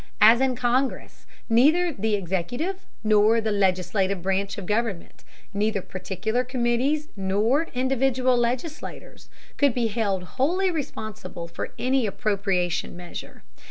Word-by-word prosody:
As 225 +4 +7
in 265 -1 +2
Congress, 250 +3 -1 0.2
neither 310 +9 +4
the 215 -2 0
executive 205 - -3 0.2
nor 215 +1 +4
legislative 195 -2 +1
branch 195 +2 -1
of 200 - -5
government, 210 -3 -2 0.3
neither 210 +1 0
particular 190 +6 -2
committees 255 +4 0
nor 210 +11 +1
individual 260 0 +2
legislators, 245 +6 -3 0.3
could 280 -4 +3
be 245 -2 +1
held 200 -4 -1
wholly 350 - 0
responsible 215 - -5
for 170 - -6
any 255 -2 +1
appropriation 195 -5 -1
measure. 175 -1 -9
225 Hz, 115 wpm, -25 LUFS, 195-260 Hz, 0.3 s, As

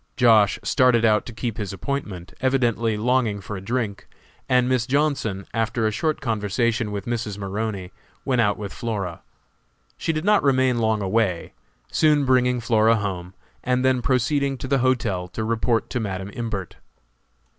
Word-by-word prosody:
Josh. 110 -5 +5
started 125 -3 +3
out 105 -2 +3
to - - -6
keep 115 0 -4
his 105 -3 -3
appointment, 95 -4 -5
evidently 120 -4 +1
longing 115 -2 +1
for 100 +1 -7
a 95 - -6
drink, 110 -1 -3 0.4
and 125 -1 +3
Miss 125 -2 +1
Johnson, 135 -9 0
after 115 0 0
a 110 - +2
short 155 +5 -1
conversation 115 -1 0
with 100 -2 -4
Mrs. 115 -4 -3
Maroney, 100 -1 -4 0.3
went 125 -3 +2
out 105 -2 +1
with 100 -2 -6
Flora. 100 -8 -4 0.8
She - - -1
did 155 +1 -3
not 210 -1 +4
remain 130 -3 +2
long 110 -2 +1
away, 95 -3 0 0.4
soon 150 -2 +3
bringing 125 -1 +3
Flora 115 -1 +3
home, 95 -4 -4 0.3
and 125 +1 +1
then 130 -1 +3
proceeding 135 +2 +1
to 130 - -6
the 135 0 +2
hotel 115 -8 0
to 95 +5 -5
report 115 +1 0
to 125 - -1
Madam 95 -2 -4
Imbert. 110 -7 -5
115 Hz, 160 wpm, -23 LUFS, 105-130 Hz, 0.8 s, Josh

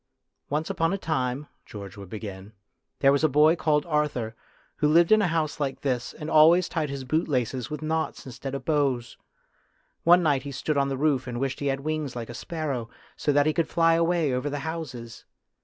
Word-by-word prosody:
"Once 150 +2 -1
upon 165 0 +1
a 195 - 0
time," 140 -5 -2 0.2
George 100 -3 -9
would 100 -3 -10
begin, 100 -1 -8 0.2
" - - -54
there 135 - +6
was 140 +2 +1
a 155 - +5
boy 150 +4 +5
called 150 -3 +1
Arthur, 150 -8 -1 0.4
who 150 - +2
lived 165 +4 +4
in 215 0 +6
a 200 - +2
house 160 -2 -1
like 140 -2 -2
this, 125 -3 -1
and 150 - -8
always 165 +3 +6
tied 155 -3 -2
his 140 -1 -5
bootlaces 130 -4 -1
with 150 +1 -5
knots 160 +1 -2
instead 135 +1 -6
of 130 -2 -6
bows. 135 -6 0 0.9
One 175 +1 +6
night 145 -4 +2
he 140 +1 -7
stood 145 +3 -2
on 140 -1 +2
the 135 - -2
roof 135 -3 +1
and 120 -1 -4
wished 135 0 -2
he 145 - -2
had 135 0 -1
wings 155 -3 -3
like 120 -1 -5
a - - -8
sparrow, 140 -4 -4 0.3
so 145 - 0
that 145 0 +3
he 155 - +2
could 165 -1 0
fly 165 -1 +3
away 165 -3 +2
over 125 +3 -1
the 145 0 -4
houses. 140 -8 -6
145 Hz, 210 wpm, -26 LUFS, 125-155 Hz, 0.9 s, there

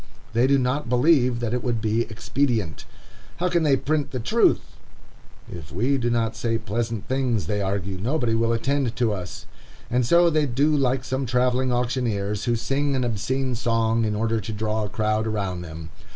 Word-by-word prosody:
They 120 +3 +3
do 140 0 +4
not 130 +1 -1
believe 125 -2 +3
that 120 -1 -1
it 125 - -1
would 120 -3 0
be 110 +2 0
expedient. 115 - -1 0.5
How 175 - -1
then - - -8
can 170 -1 +2
they 140 -3 +4
print 140 -4 -2
truth? - - +4 0.9
If 85 -2 -9
we 130 +9 +1
do 120 0 0
not 115 -1 0
say 115 0 -1
pleasant 115 0 -3
things, 125 -5 0
they 105 -1 -1
argue, 95 -1 -2
nobody 120 +2 0
will 115 +1 +1
attend 130 +1 0
to 115 -4 +1
us. 90 -3 -7 0.5
And 125 +1 +2
so 170 +7 +4
they 155 -2 +2
do 140 +5 +2
like 130 -2 +1
some 130 +1 -2
travelling 125 +1 +1
auctioneers, 115 -5 -1
who 120 - +2
sing 135 +4 0
an 130 - 0
obscene 125 +3 -1
song 115 -1 +1
in 105 -1 0
order 115 +1 0
to 110 +3 -6
draw 110 0 -1
a - - -5
crowd 110 +1 0
around 100 -5 -2
them. 80 -2 -8
120 Hz, 185 wpm, -24 LUFS, 110-130 Hz, 0.9 s, do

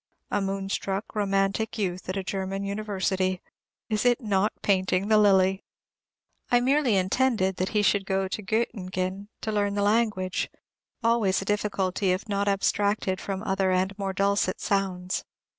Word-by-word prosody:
A 205 - +1
moonstruck, 195 +1 -3
romantic 200 +2 0
youth 185 -3 -3
at 185 - -2
a 195 - -2
German 195 +1 -3
University. 195 -2 -1 0.5
Is 215 -2 0
it 245 -1 +3
not 210 -3 +1
painting 190 0 +1
the 215 - +6
lily? 190 -2 +4 0.9
I 245 - +5
merely 260 -2 +2
intended 190 -1 +1
he 210 -1 +1
should 200 -1 +2
go 190 0 0
to 200 - -4
Göttingen 195 -3 -2
to 220 - -2
learn 205 -1 0
the 205 - +1
language, 205 -4 +1 0.5
always 225 -5 +3
a - - -11
difficulty, 200 -2 0
if 190 +5 -4
not 200 -1 -1
abstracted 200 -1 +1
from 195 0 -4
other 190 -2 +1
and 185 +2 +1
more 195 -1 -1
dulcet 200 0 +1
sounds. 185 -2 -1
195 Hz, 145 wpm, -26 LUFS, 190-210 Hz, 0.9 s, the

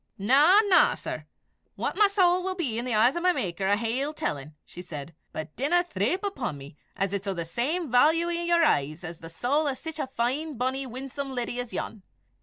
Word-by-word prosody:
"Na, 285 - +6
na, 400 -4 +4
sir! - - -6 0.5
what - - -2
my 415 0 +5
sowl 365 -3 +3
may 375 0 -3
be 260 -11 -2
in 240 - -4
the 250 - -2
eyes 240 +7 +4
o' 345 - -2
my 365 +1 +4
Maker, 190 - -2
I 200 - +4
hae 230 +3 -1
ill 295 +2 -3
tellin'," 150 - -4
she 180 - -10
said, 155 -2 -8 0.2
"but 155 0 -7
dinna 285 +8 +2
ye - - -25
threep 245 - 0
upo' 330 -12 -2
me 140 0 -11 0.2
'at 195 0 -1
it's 200 0 -3
o' 195 - -1
the 170 -1 -3
same 270 - -2
vailue 320 +7 +4
i' 340 0 -1
your 340 0 +3
eyes 150 - 0
as 165 -1 -7
the 165 - -10
sowl 275 - 0
o' 280 - +1
sic 320 +4 -7
a 270 - -1
fine, 265 +4 -2
bonnie, 260 +2 -1
winsome 265 +2 -6
leddy 245 0 -2
as 245 -2 -4
yon. 220 - -5
255 Hz, 225 wpm, -27 LUFS, 195-320 Hz, 0.5 s, Na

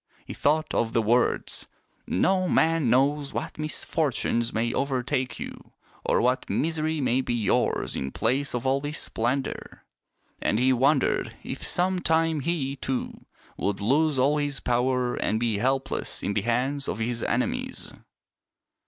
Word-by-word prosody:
He - - -6
thought 155 +2 +1
of 115 -1 0
the 115 - +3
words, 120 +3 +1 0.2
" - - -41
No 185 - +2
man 160 -5 +3
kno.ws 140 +3 +2
what - - -4
misfortunes 145 -6 0
may 115 +1 0
overtake 130 -1 -1
you, - - -8 0.3
or - - +2
what 125 +2 +1
misery 160 0 0
may 130 -1 +2
be 120 - -2
yours 110 -3 +1
in 65 - -2
place 130 - 0
of 120 - -3
all 135 +1 +2
this 145 +1 -3
splendor." 125 +4 -3 0.6
And 105 - +1
he 130 +2 +4
wondered 135 +2 +2
if - - -6
some 185 +1 +1
time 160 -2 +2
he, 140 -2 -1
too, 130 -1 -4 0.3
would 100 -1 -1
lose 140 +7 +2
all 140 +4 +3
his 145 -2 -1
power 125 0 0
and 110 - 0
be 115 -3 0
helpless 135 +3 -1
in 100 - -1
the 105 - +1
hands 130 +5 0
of - - -2
his 115 +1 -1
enemies. - - -2
130 Hz, 155 wpm, -26 LUFS, 120-150 Hz, 0.6 s, he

